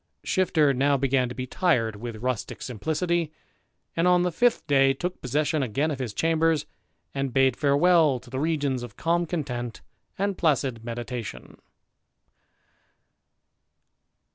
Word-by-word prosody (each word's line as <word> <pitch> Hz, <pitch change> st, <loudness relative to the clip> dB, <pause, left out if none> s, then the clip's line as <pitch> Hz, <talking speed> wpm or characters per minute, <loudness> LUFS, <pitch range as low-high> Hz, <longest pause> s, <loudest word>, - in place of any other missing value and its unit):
Shifter 160 Hz, -7 st, +2 dB
now 140 Hz, +2 st, +2 dB
began 130 Hz, -2 st, +1 dB
to 125 Hz, -, -7 dB
be 130 Hz, 0 st, -4 dB
tired 125 Hz, -, +1 dB
with 110 Hz, +1 st, -7 dB
rustick 125 Hz, -3 st, -3 dB
simplicity, 160 Hz, -, -1 dB, 0.6 s
and 165 Hz, +2 st, +2 dB
on 180 Hz, 0 st, +4 dB
the 180 Hz, -, 0 dB
fifth 240 Hz, +7 st, +2 dB
day 135 Hz, -1 st, +4 dB
took 180 Hz, +5 st, -4 dB
possession 150 Hz, +4 st, 0 dB
again 135 Hz, +6 st, 0 dB
of 140 Hz, -, -4 dB
his 125 Hz, -4 st, -3 dB
chambers, 165 Hz, +3 st, +1 dB, 0.5 s
and 135 Hz, -1 st, -2 dB
bade 130 Hz, -1 st, +3 dB
farewel 150 Hz, 0 st, +4 dB
to 125 Hz, -1 st, -16 dB
the 130 Hz, -, -3 dB
regions 145 Hz, -4 st, 0 dB
of 120 Hz, -4 st, -9 dB
calm 170 Hz, +1 st, +1 dB
content 125 Hz, -8 st, -4 dB, 0.3 s
and 200 Hz, 0 st, -1 dB
placid, 135 Hz, -7 st, +1 dB
meditation. 120 Hz, -, -6 dB
140 Hz, 135 wpm, -26 LUFS, 125-165 Hz, 0.6 s, on